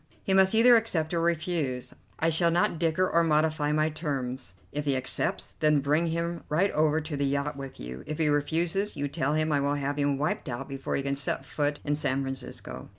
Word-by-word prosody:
He 190 - 0
must 190 +2 +5
either 240 +2 +7
accept 175 -8 -1
or 170 - +1
refuse. 160 -6 -1 0.2
I 165 +1 +1
shall 170 +2 +4
not 170 -1 +1
dicker 170 +2 +2
or 170 -1 +3
modify 155 -1 +1
my 155 +1 +2
terms. 130 - -4 0.2
If 150 +1 -3
he 140 -2 +1
accepts, 130 0 -1
then 150 -1 +2
bring 150 +4 +1
him 170 +1 -2
right 175 +7 +2
over 155 0 +2
to 155 -1 -5
the 140 - -1
yacht 140 +1 -1
with 135 -1 -8
you; 65 +2 -7
if 155 - -4
he 160 - +1
refuses, 165 +7 0
you 145 0 -1
tell 145 +1 -1
him 155 0 +1
I 145 - +2
will 140 +1 +1
have 145 0 -2
him 140 -1 +1
wiped 150 0 -2
out 120 -1 -5
before 135 0 -4
he 135 - -1
can 140 0 -1
set 140 -1 -2
foot 145 +1 -1
in 145 - +1
San 140 -2 0
Francisco." 125 - -7
150 Hz, 215 wpm, -28 LUFS, 140-165 Hz, 0.2 s, either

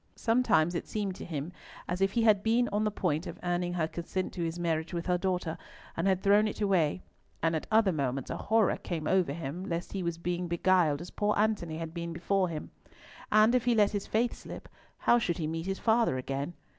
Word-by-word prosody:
Sometimes 225 -9 +2
it 170 - -3
seemed 205 -3 -2
to - - -7
him 155 0 -4 0.4
as 180 +2 -3
if 195 0 +2
he 235 - +2
had 210 -3 +5
been 230 +3 +2
on 210 +1 0
the - - +2
point 180 -5 -1
of 170 - -7
earning 175 0 0
her 165 -3 0
consent 175 +3 -4
to 180 - -5
his 165 +1 -3
marriage 165 0 -1
with 170 - -3
her 180 -1 +1
daughter, 180 -3 -2 0.4
and 165 +3 0
had 190 -1 +1
thrown 205 +2 +5
it - - -5
away, 185 -5 +1 0.4
and 165 0 +2
at 160 - -3
other 220 -3 +4
moments 135 -4 -2
a - - -3
horror 220 -1 +2
came 165 -4 -4
over 185 -3 +2
him 160 +3 -5
lest 170 -2 -4
he 195 - -2
was 170 -1 -2
being 175 +1 -2
beguiled 170 -3 +2
as 175 - -8
poor 210 0 0
Antony 205 -7 0
had 165 -1 -5
been 170 -1 -4
before 185 +2 0
him. 155 -2 -6 0.6
And 215 +2 +5
if 250 -1 +2
he 240 -1 +3
let 210 -2 +4
his 205 -2 -3
faith 230 +2 +1
slip, - - -9 0.3
how 240 - +4
should 175 -7 -1
he 165 - -2
meet 165 +3 -3
his 195 0 -1
father 225 - +2
again? 135 +5 -4
180 Hz, 225 wpm, -30 LUFS, 165-205 Hz, 0.6 s, had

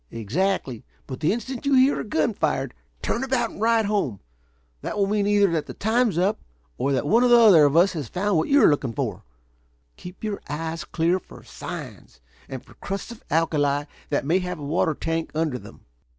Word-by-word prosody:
"Exactly. 130 - -2 0.2
But 130 -2 -7
the 155 - +2
instant 240 +3 -4
you 280 -1 +2
hear 260 +2 +4
a - - -3
gun 210 0 0
fired, 135 -7 -1 0.3
turn 235 - -1
about 255 -3 0
and - - -11
ride 225 -1 +3
home. 195 - -1 0.6
That - - -4
will 200 - +3
mean 205 0 0
either 205 -2 +3
that 160 -2 -1
the - - -8
time's 220 -2 +1
up, 190 +4 +1 0.4
or 140 - 0
that 135 +1 0
one 230 +10 +4
or - - +5
the 240 0 +7
other 200 -10 +7
of 145 +2 +2
us 180 +3 +5
has 150 -7 -4
found 200 - -1
what 160 - +1
you 285 0 +5
are - - +8
looking 135 -5 -1
for. 115 -9 -3 0.7
Keep 180 +3 -11
your 210 -2 -3
eyes 160 +3 -4
clear 170 +3 +1
for - - -15
signs - - -9 0.3
and 130 -2 -7
for - - -17
crusts 195 +4 -6
of 235 - -12
alkali 145 -3 +1 0.3
that 145 -2 -1
may 170 +6 +2
have 180 -1 -4
a 145 - -7
water 155 +1 +1
tank 165 +2 -2
under 155 -5 -1
them." - - -14
175 Hz, 210 wpm, -24 LUFS, 145-210 Hz, 0.7 s, are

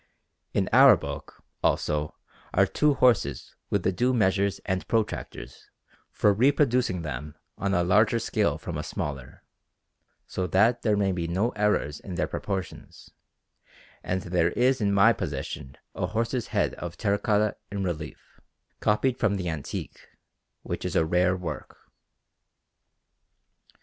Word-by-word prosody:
In - - 0
our - - +8
book, - - -8 0.2
also, 75 0 0 0.4
are - - +5
two 150 -2 +2
horses 125 -5 +2 0.2
with 100 -3 0
the - - +2
due 125 +7 +1
measures 100 -2 +2
and 95 -1 -2
protractors 105 - -3 0.4
for 105 - +2
reproducing 125 - +2
them 75 0 -6 0.2
on 100 0 -1
a 90 - +2
larger 105 +6 +3
scale 115 - 0
from - - -5
a - - -3
smaller, 70 -4 -6 0.8
so 90 -1 -3
that 105 +8 +3
there 105 -3 +2
may 100 -1 +2
be 85 -2 -2
no 95 +8 0
errors 105 - 0
in 95 - -7
their 85 - 0
proportions; 95 -2 -6 0.9
and 95 0 -2
there 85 -2 +1
is 130 0 +2
in 100 -1 +2
my 100 -1 +5
possession 65 0 -5 0.2
a - - -2
horse's 115 +2 -2
head - - 0
of 85 0 -6
terra 100 -2 +1
cotta 105 -1 +1 0.2
in 100 -1 -2
relief, 80 -4 -6 0.4
copied 125 +4 +1
from 105 -2 +2
the 90 -2 -3
antique, 75 -4 -6 0.6
which - - -4
is - - -3
a 80 - +3
rare 90 +3 +2
work. 80 -7 -6
95 Hz, 140 wpm, -26 LUFS, 85-110 Hz, 0.9 s, our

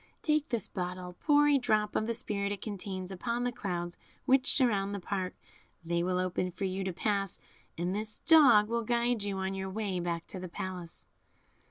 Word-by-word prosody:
Take 305 -1 +1
this 235 -6 -1
bottle, 180 0 -5
pour 295 -1 +4
a 285 -1 +5
drop 215 -4 +1
of 215 - +1
the 230 - 0
spirit 200 -2 -2
it 200 -2 -4
contains 195 -3 -5
upon 235 +6 -2
the 245 - 0
clouds 175 -6 -4 0.3
which 265 0 +4
surround 205 -6 +2
the - - -3
park; 185 0 -3 0.5
they 170 +1 0
will 180 +1 0
open 180 0 0
for 185 +3 -4
you 190 +1 -2
to 190 - -1
pass, 195 +1 -1 0.4
and 175 +2 -1
this 215 +1 -2
dog 265 -11 +7
will 235 +1 -1
guide 235 0 +1
you 200 -1 -2
on 190 0 -2
your 190 0 -3
way 195 -2 -2
back 170 -1 -2
to 190 - -6
the 180 -1 -6
palace." 180 -1 -6
200 Hz, 195 wpm, -31 LUFS, 185-230 Hz, 0.5 s, dog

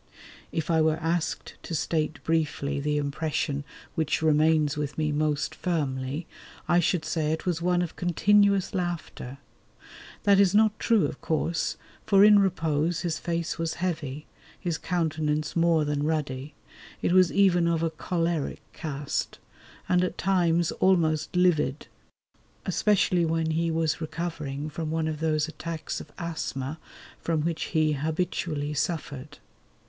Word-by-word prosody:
If 160 +1 -2
I 160 -1 +4
were 155 0 +3
asked 165 0 -2
to 165 - -5
state 155 -1 -1
briefly 150 -3 0
the 150 +1 0
impression 145 0 -1 0.3
which 160 -1 0
remains 155 -1 +3
with 150 -1 -3
me 155 -1 0
most 150 0 0
firmly, 145 -3 -2 0.4
I 175 - +4
should 170 -1 +1
say 155 -1 0
it 160 - -3
was 175 -3 0
one 180 0 +2
of 170 - -6
continuous 200 +2 +3
laughter. 175 -7 -4 0.9
That 200 -1 +5
is 200 0 +4
not 215 0 +4
true, 225 -4 +3
of 140 - -5
course, 165 +1 -1 0.3
for 195 -1 +5
in 210 -1 +8
repose 165 -3 +1
his 165 -3 -2
face 170 -1 -2
was 165 -1 -1
heavy, 155 -5 -3 0.3
his 170 -3 -2
countenance 155 -4 -1
more 165 -2 +3
than 145 -1 -1
ruddy; 145 -3 -2 0.5
it - - +2
was 185 -1 +5
even 180 -4 +4
of 165 -1 +1
a 165 - 0
"choleric" 165 -1 -2
cast, 145 -3 -3 0.5
and 180 0 +3
at 180 - -2
times 175 -3 +2
almost 160 -4 +2
livid, 155 -6 +2 0.8
especially 190 -4 +2
when 165 0 0
he 165 +1 +1
was 160 0 0
recovering 155 -3 -4
from 155 +1 -4
one 160 0 0
of 155 -1 -3
those 155 -1 +1
attacks 160 0 -5
of - - -13
asthma 160 -4 -4 0.4
from 165 -2 0
which 165 +1 -1
he 155 -1 +1
habitually 155 0 -2
suffered. 145 -2 -3
160 Hz, 145 wpm, -27 LUFS, 150-175 Hz, 0.9 s, in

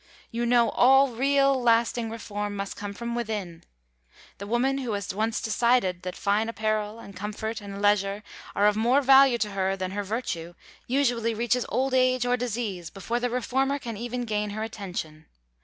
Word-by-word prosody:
You 235 +1 -1
know 240 -1 +4
all 270 +2 +5
real, 275 +2 +2
lasting 230 0 +2
reform 210 -2 -5
must 200 0 -4
come 205 0 -6
from 235 +3 -5
within. 210 -8 -4 0.8
The 200 - -6
woman 260 +5 +1
who 245 -5 -3
has 200 -1 -3
once 220 +3 -1
decided 220 -5 +1
that 180 -1 -5
fine 210 +3 0
apparel, 215 -1 -2
and 200 -4 -11
comfort, 215 +3 -4
and 200 -1 -7
leisure, 205 0 +2 0.3
are 200 - +3
of 210 0 +4
more 245 +6 +3
value 270 -1 +7
to 210 -2 -2
her 195 -1 0
than 185 -1 -3
her 205 +1 -2
virtue 180 -6 -4 0.3
usually 240 -4 +1
reaches 240 +2 0
old 265 +1 0
age 255 -1 +3
or 245 0 +2
disease 220 -8 -3
before 230 +7 -3
the 245 0 -1
reformer 265 +3 0
can 235 -5 -6
even 240 +3 -4
gain 210 -2 -1
her 215 +2 -4
attention. 180 -8 -6
225 Hz, 175 wpm, -26 LUFS, 205-245 Hz, 0.8 s, value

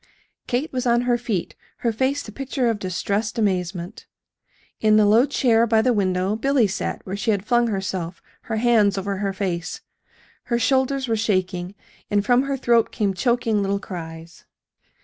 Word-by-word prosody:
Kate 260 +5 -2
was 255 -1 -1
on 240 0 +3
her 245 0 +2
feet, 230 -7 -3 0.3
her 230 - +3
face 265 +5 0
the 215 - -9
picture 260 0 -1
of 215 - -4
distressed 200 +4 -2
amazement. 185 -2 -2 0.7
In 215 -1 +4
the 215 - +5
low 225 +6 +5
chair 235 -4 +3
by 220 -1 +3
the 250 - +3
window 190 -1 0
Billy 270 +1 +2
sat 200 0 -3
where 190 - -4
she 205 - -2
had 205 -2 +1
flung 240 0 +3
herself, 190 -4 -3 0.3
her 225 - 0
hands 215 -4 +3
over 195 0 -2
her 200 0 -1
face. 185 -4 -3 0.6
Her 235 - 0
shoulders 265 +2 +1
were 225 - +1
shaking, 185 -3 -1 0.3
and 205 -1 +1
from 245 +2 +4
her 275 0 -2
throat 235 -3 +2
came 205 -4 0
choking 230 0 +1
little 200 0 0
cries. 165 -3 -9
215 Hz, 170 wpm, -22 LUFS, 195-240 Hz, 0.7 s, the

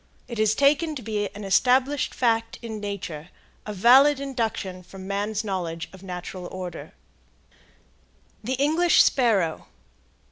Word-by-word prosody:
It 235 -3 -6
is 215 0 +3
taken 300 +4 +2
to 255 - -7
be 210 -2 -2
an 205 - -7
established 255 +7 +2
fact 230 -2 0
in 220 -2 -5
nature, 180 -6 -6 0.4
a - - -3
valid 265 +8 +6
induction 225 -9 -3
from 190 +1 -11
man's 205 +2 -2
knowledge 175 -5 -4
of 190 - -13
natural 180 -1 -7
order. 180 -1 -7 1.5
THE 255 +4 -1
ENGLISH 320 +5 +4
SPARROW. 205 - +1
215 Hz, 130 wpm, -25 LUFS, 190-255 Hz, 1.5 s, valid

